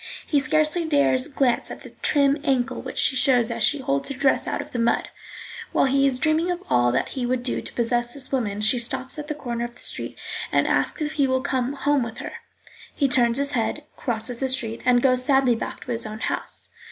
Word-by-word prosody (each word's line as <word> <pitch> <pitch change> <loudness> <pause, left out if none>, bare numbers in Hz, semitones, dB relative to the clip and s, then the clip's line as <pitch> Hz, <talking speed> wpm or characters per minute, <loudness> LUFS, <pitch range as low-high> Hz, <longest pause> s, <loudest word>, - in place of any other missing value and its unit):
He 290 - +2
scarcely 310 +3 +1
dares 285 -4 +2
glance 265 -4 0
at - - -8
the - - -11
trim 285 0 +3
ankle 265 -3 0
which 255 - -8
she 265 - +3
shows 250 -3 +3
as 230 0 -4
she 295 - +3
holds 275 +1 -1
her 275 - -4
dress 270 +1 +2
out - - -2
of - - -7
the 245 - -3
mud. 230 0 +1 0.6
While - - +3
he 275 +1 +3
is 260 -2 +1
dreaming 310 +5 +1
of 355 0 -3
all 120 -1 +4
that - - 0
he 260 - -4
would 245 0 -1
do 250 - -1
to - - -7
possess 240 +1 0
this 275 -2 -4
woman, 210 -6 -1
she 215 +4 +2
stops 260 +4 -1
at 295 - -6
the 300 - -3
corner 240 -5 -4
of 240 0 -6
the - - -12
street - - -3 0.3
and - - +3
asks 315 - 0
if 300 - -2
he 290 -3 +1
will 260 0 +1
come 260 -1 -1
home 285 0 +1
with 235 -1 -5
her. - - -6 0.6
He 280 - +2
turns 240 -2 +3
his 280 0 0
head, 245 +5 -1
crosses 235 -1 -4
the 265 - 0
street, 230 -3 -1
and 245 -1 +4
goes 255 -1 +4
sadly 265 -2 +4
back 225 - -6
to 250 - -5
his 230 -1 +1
own 215 0 -6
house. - - -2
260 Hz, 235 wpm, -24 LUFS, 240-280 Hz, 0.6 s, all